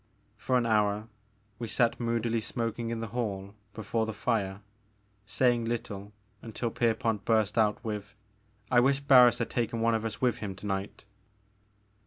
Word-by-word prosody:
For 125 Hz, +4 st, 0 dB
an 120 Hz, -, +1 dB
hour 105 Hz, 0 st, +1 dB, 0.5 s
we 115 Hz, -, -4 dB
sat 115 Hz, +1 st, +1 dB
moodily 115 Hz, -1 st, 0 dB
smoking 115 Hz, +1 st, -3 dB
in 115 Hz, -1 st, -3 dB
the 115 Hz, -, -4 dB
hall 100 Hz, -5 st, -3 dB, 0.2 s
before 110 Hz, +1 st, -1 dB
the 110 Hz, -, -3 dB
fire, 100 Hz, -3 st, -1 dB, 0.7 s
saying 120 Hz, +1 st, +2 dB
little 105 Hz, -3 st, -4 dB, 0.3 s
until 115 Hz, +1 st, -4 dB
Pierpont 115 Hz, -3 st, 0 dB
burst 110 Hz, -3 st, +2 dB
out 110 Hz, -1 st, +2 dB
with: 105 Hz, -2 st, -5 dB, 0.6 s
'*I 125 Hz, -, +6 dB
wish 135 Hz, +2 st, +3 dB
Barns 125 Hz, -4 st, +7 dB
had 115 Hz, -, -3 dB
taken 115 Hz, -1 st, -1 dB
one 115 Hz, 0 st, +2 dB
of 110 Hz, -1 st, 0 dB
us 115 Hz, -2 st, -4 dB
with 125 Hz, -2 st, +1 dB
him 100 Hz, -3 st, -5 dB
to 95 Hz, -, -11 dB
night 95 Hz, 0 st, -4 dB
115 Hz, 160 wpm, -29 LUFS, 105-120 Hz, 0.7 s, Barns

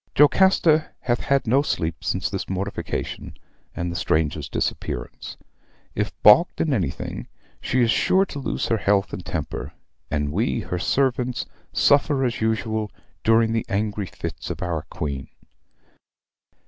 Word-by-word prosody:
"Jocasta 160 Hz, 0 st, +5 dB
hath 120 Hz, -1 st, 0 dB
had 140 Hz, 0 st, +1 dB
no 130 Hz, +5 st, +4 dB
sleep 80 Hz, -, -2 dB
since -, -, 0 dB
this -, -, -4 dB
mortification, 95 Hz, +2 st, -4 dB, 0.4 s
and 85 Hz, 0 st, -2 dB
the -, -, -6 dB
stranger's 75 Hz, -3 st, 0 dB
disappearance. -, -, -4 dB, 0.6 s
If -, -, -1 dB
balked 165 Hz, -, +7 dB
in 155 Hz, -, +1 dB
anything, 90 Hz, -, -3 dB, 0.3 s
she 130 Hz, -, +1 dB
is 115 Hz, -1 st, +4 dB
sure 190 Hz, -, +3 dB
to 145 Hz, -, -7 dB
lose 135 Hz, -, -2 dB
her 115 Hz, -, +3 dB
health 100 Hz, -1 st, +1 dB
and -, -, -5 dB
temper; -, -, -4 dB, 0.4 s
and 75 Hz, 0 st, -1 dB
we, 115 Hz, +6 st, 0 dB
her 90 Hz, -3 st, -3 dB
servants, 125 Hz, +2 st, 0 dB, 0.3 s
suffer, 140 Hz, -1 st, +3 dB
as 120 Hz, -2 st, -2 dB
usual, 110 Hz, -1 st, 0 dB, 0.3 s
during 115 Hz, 0 st, +4 dB
the 115 Hz, -, 0 dB
angry 105 Hz, -1 st, -1 dB
fits -, -, -6 dB
of -, -, -4 dB
our 85 Hz, -3 st, -3 dB
Queen. 70 Hz, -5 st, -4 dB
110 Hz, 140 wpm, -23 LUFS, 90-135 Hz, 0.6 s, balked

